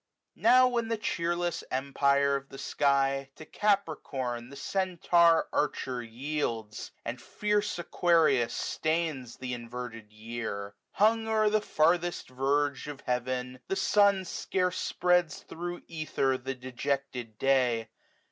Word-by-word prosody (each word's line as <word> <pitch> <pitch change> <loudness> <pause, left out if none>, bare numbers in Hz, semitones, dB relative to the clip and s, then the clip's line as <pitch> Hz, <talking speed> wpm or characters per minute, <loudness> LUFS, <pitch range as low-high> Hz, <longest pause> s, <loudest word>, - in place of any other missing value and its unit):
40 - - -25
Now 255 0 +7
when 235 -2 0
the 225 0 -1
cheerless 175 -3 -1
empire 140 +1 +2
of 140 0 -5
the 135 - -10
sky 135 -1 +1
To 155 - -11
Capricorn 140 - -1
the 140 - -11
Centaur 170 0 +3
Archer 130 -4 -1
yields. 115 -3 -4 0.2
And 120 +1 -4
fierce 210 +8 -1
Aquarius 165 -8 +3
stains 155 -7 -2
th' - - -15
inverted 120 -3 -6
year; 110 -2 -5 0.2
Hung 220 +2 +3
o'er 215 -1 +3
the 215 0 +3
farthest 175 -3 +1
verge 140 +2 0
of 145 -2 -7
heaven, 125 +1 -2
the 195 - -1
sun 200 -1 +3
Scarce 180 +1 -1
spreads 180 -2 +1
thro' 175 +1 -6
ether 155 -4 0
the 130 +1 -4
dejected 125 -2 -3
day. 125 -4 +2
140 Hz, 125 wpm, -29 LUFS, 125-175 Hz, 0.2 s, Now